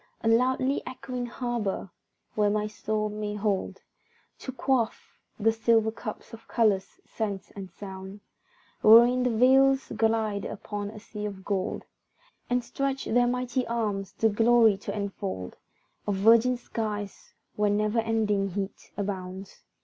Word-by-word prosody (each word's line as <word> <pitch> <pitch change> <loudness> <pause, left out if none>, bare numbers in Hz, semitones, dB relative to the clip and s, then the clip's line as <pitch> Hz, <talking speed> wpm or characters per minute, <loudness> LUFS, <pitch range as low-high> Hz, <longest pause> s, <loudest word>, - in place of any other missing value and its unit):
A - - -2
loudly 255 +4 +2
echoing 250 -1 -5
harbour, 235 -6 -3 0.4
where 210 -1 +2
my 210 0 0
soul 215 0 -2
may 210 0 -4
hold 205 -2 -2 0.6
To 260 - -6
quaff, 255 -3 -1 0.2
the 225 +1 +4
silver 225 -1 +2
cup 220 -1 -7
of 230 - -11
colours, 210 -5 +1
scents 205 -4 -4
and 195 -2 -8
sounds, 190 +2 -9 0.6
Wherein 240 +3 +7
the 250 - +2
vessels 265 +3 +4
glide 220 -2 +1
upon 205 0 -5
a 215 0 -10
sea 210 0 -7
of 195 -2 -7
gold, 195 -2 -2 0.7
And 245 0 +1
stretch 275 +2 -2
their 245 +1 +3
mighty 250 0 -1
arms, 205 -4 -2
the 225 +2 +2
glory 225 0 +5
to 200 - -5
enfold 95 - -4 0.5
Of 205 - +1
virgin 230 +5 +5
skies, 210 -4 -5 0.2
where 210 0 +2
never 210 +2 +1
ending 215 -3 +1
heat 195 +1 -5
abounds. 190 -1 -5
215 Hz, 135 wpm, -27 LUFS, 205-240 Hz, 0.7 s, Wherein